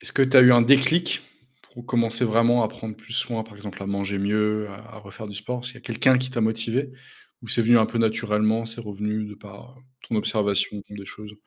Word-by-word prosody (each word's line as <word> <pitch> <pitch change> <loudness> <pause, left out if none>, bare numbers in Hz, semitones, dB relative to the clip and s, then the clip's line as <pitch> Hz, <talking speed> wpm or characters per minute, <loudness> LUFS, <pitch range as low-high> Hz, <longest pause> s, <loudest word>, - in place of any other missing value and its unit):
est-ce - - -4
que 135 - +3
tu 135 +1 +4
as 130 - +11
eu 125 - +8
un 120 -1 +6
déclic, 140 +7 +3 0.5
pour 120 0 -12
commencer 115 0 0
vraiment 115 +1 +3
à - - -1
prendre 110 -1 -8
plus 115 - -13
soin, 115 -2 -2
par 110 -2 -16
exemple, 100 -1 -9
à - - -6
manger 100 0 -2
mieux, 105 +1 0
à 100 - -10 0.2
à - - -10
refaire 105 +1 -11
du 100 - -9
sport? 120 +5 -5
Est-ce 125 - -5
qu'il 125 - -14
y - - -29
quelqu'un 125 +2 +2
qui 130 0 -4
t'a 120 -2 -3
motivé, 115 +5 -1 0.5
ou - - -11
c'est 115 - +2
venu 120 +1 +5
un 110 - +3
peu 115 - -4
naturellement, 110 0 0
c'est 115 +1 -6
revenu 105 0 -4
de 105 0 -9
par, 105 +6 -15
heu, - - -24 0.3
ton 115 - -1
observation 105 -1 0
des 100 -1 -9
choses? 105 0 -11
110 Hz, 240 wpm, -24 LUFS, 105-120 Hz, 0.5 s, as